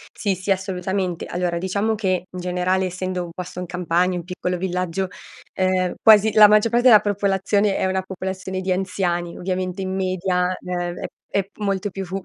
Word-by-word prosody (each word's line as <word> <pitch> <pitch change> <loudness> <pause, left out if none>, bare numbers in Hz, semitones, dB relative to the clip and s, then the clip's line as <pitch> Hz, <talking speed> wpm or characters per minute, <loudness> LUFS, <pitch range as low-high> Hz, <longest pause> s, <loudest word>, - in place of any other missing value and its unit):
Sì, 200 -3 0
sì, 190 +2 -3
assolutamente. 190 -2 -2
Allora, 175 -1 -2
diciamo 200 +5 0
che, 185 -4 0
in 180 - -8
generale 180 +1 0
essendo 185 0 -3
un 170 - -8
posto 180 +1 -7
in 180 - -4
campagna, 180 +1 0
un 175 - -5
piccolo 180 0 -3
villaggio, 185 +1 -2 0.5
uhm, 185 -1 +1
quasi 215 0 +6
la 215 -1 +9
maggior 215 +2 +4
parte 240 +2 +4
della 220 -4 +9
popolazione, 200 0 +1
è - - 0
una 190 0 0
popolazione 190 0 -5
di 190 - -2
anziani. 180 -2 -1
Ovviamente 185 0 -3
in 190 0 -3
media, 185 -1 0 0.2
ehm, 175 -1 -3
è - - -4 0.3
è 195 -1 0
molto 200 -1 -1
più 195 +1 -5
fu 190 +2 -4
185 Hz, 180 wpm, -22 LUFS, 180-195 Hz, 0.5 s, la